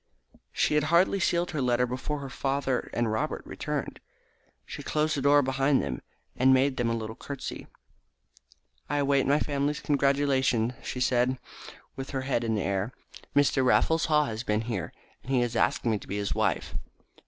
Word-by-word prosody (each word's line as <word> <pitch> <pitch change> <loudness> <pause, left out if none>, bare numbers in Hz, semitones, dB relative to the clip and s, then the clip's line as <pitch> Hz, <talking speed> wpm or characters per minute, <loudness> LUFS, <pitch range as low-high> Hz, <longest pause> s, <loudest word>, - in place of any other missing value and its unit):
She - - +1
had 150 0 +2
hardly 170 +5 +3
sealed 175 -1 +1
her 155 -4 -2
letter 125 -1 +2
before 130 +4 -4
her 135 - -6
father 135 -1 -1
and 120 -2 0
Robert 110 - -2
returned. - - -4 0.7
She - - -7
closed 155 0 0
the 140 - -2
door 145 +1 +5
behind 135 +1 +2
them, 65 - -3 0.3
and 130 +1 +4
made 130 +1 +2
them 120 -1 +1
a 115 - 0
little 110 -1 -5
curtsey. 140 +1 -7 1.2
"I 145 - 0
await 140 -2 +2
my 145 +2 +4
family's 145 0 -1
congratulations," 135 -4 +2
she 125 - -5
said, 125 +1 +2 0.6
with 135 0 -6
her 135 - -2
head 130 -3 -1
in 110 -1 0
the 105 - -1
air. 100 +5 -1 0.4
"Mr. 145 -2 +3
Raffles 160 +5 +3
Haw 150 -1 +3
has 110 -3 -4
been 105 -3 0
here, 110 -7 -4 0.3
and 130 - -7
he 130 -2 +3
has 120 -1 -1
asked - - +1
me 110 -3 +1
to - - -13
be 100 - -3
his 100 0 -1
wife." 110 -7 -1
130 Hz, 180 wpm, -28 LUFS, 115-145 Hz, 1.2 s, door